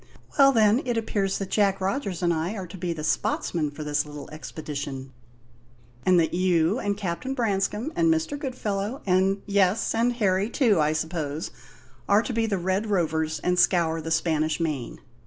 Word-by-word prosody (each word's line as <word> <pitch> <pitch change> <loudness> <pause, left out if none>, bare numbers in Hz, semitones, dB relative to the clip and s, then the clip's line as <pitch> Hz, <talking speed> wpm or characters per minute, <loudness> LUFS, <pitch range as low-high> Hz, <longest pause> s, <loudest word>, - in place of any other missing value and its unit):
Well, 275 0 +8
then, 220 0 +4
it 240 -2 -1
appears 200 -3 -1
that 195 -1 -5
Jack 200 -2 +2
Rogers 190 -2 -2
and 170 -1 +3
I 165 +6 -2
are 190 -3 -5
to 180 - -10
be 180 -1 -3
the 160 -2 -5
spotsmen 155 0 0
for 145 +2 -8
this 145 0 0
little 150 -1 -9
expedition, 145 -4 -6 0.9
and 180 -1 +6
that 160 - +1
you 180 +3 +2
and 200 -3 -1
Captain 205 +7 -3
Branscome, 220 +4 -1
and 335 -1 +3
Mr. 320 -2 0
Goodfellow, 245 -4 -3
and 190 +1 +2
yes, 200 0 +2
and 235 +2 +2
Harry, 200 -3 +1
too, 230 - +3
I 150 0 +2
suppose 155 -1 -3 0.6
are 205 +2 +5
to 250 - -4
be 225 0 +1
the 200 -3 0
Red 190 +4 -1
Rovers 160 -5 0
and 180 0 +1
scour 165 -3 +3
the 160 - -5
Spanish 160 -1 +1
Main. 150 -7 -3
185 Hz, 175 wpm, -25 LUFS, 160-215 Hz, 0.9 s, Well